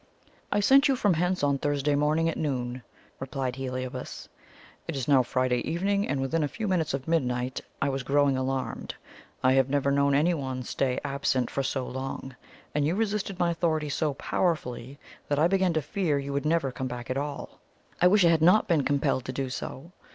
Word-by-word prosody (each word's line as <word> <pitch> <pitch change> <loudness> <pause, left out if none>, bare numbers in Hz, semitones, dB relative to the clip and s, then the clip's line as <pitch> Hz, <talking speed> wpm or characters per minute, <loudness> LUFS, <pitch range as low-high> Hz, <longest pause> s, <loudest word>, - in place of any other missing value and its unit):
"I 205 - +2
sent 275 +7 +6
you 270 - +3
from 205 -6 +2
hence 180 +1 0
on 140 -1 +2
Thursday 145 0 0
morning 150 +3 +2
at 165 - -1
noon," 125 -4 -2 0.4
replied 130 -1 -3
Heliobas. 130 -1 -5 0.6
"It - - -3
is 135 -3 -3
now 140 -3 +6
Friday 130 0 0
evening, 200 +4 0
and 140 - -1
within 150 +4 0
a - - +1
few 215 - -4
minutes 170 -7 +1
of 135 -1 -7
midnight. 130 -6 0 0.2
I 140 - +2
was 135 0 -2
growing 140 +1 +2
alarmed. 130 0 -3 0.5
I 130 0 +5
have 135 0 +3
never 140 0 +1
known 140 0 +3
anyone 140 -5 0
stay 125 +1 -1
absent 135 -3 0
for 140 - -1
so 135 -1 -2
long; 130 0 -6 0.4
and 150 - +1
you 160 +5 +1
resisted 205 -3 -1
my 175 -1 +2
authority 160 -3 0
so 145 0 -1
powerfully, 135 -6 -2 0.3
that 145 - 0
I 155 +3 +4
began 190 -1 +2
to 155 -2 0
fear 170 -4 0
you 140 0 -4
would 140 +2 -1
never 155 -4 +1
come 130 +1 -4
back 125 0 -6
at 130 - -1
all." 145 0 -5 0.4
"I 180 - +7
wish 195 0 +5
I - - +6
had 165 -1 +3
not 180 +6 +5
been 165 -5 +3
compelled 140 -2 0
to - - -3
do 130 0 -3
so!" 135 +5 -6
140 Hz, 200 wpm, -27 LUFS, 130-165 Hz, 0.6 s, I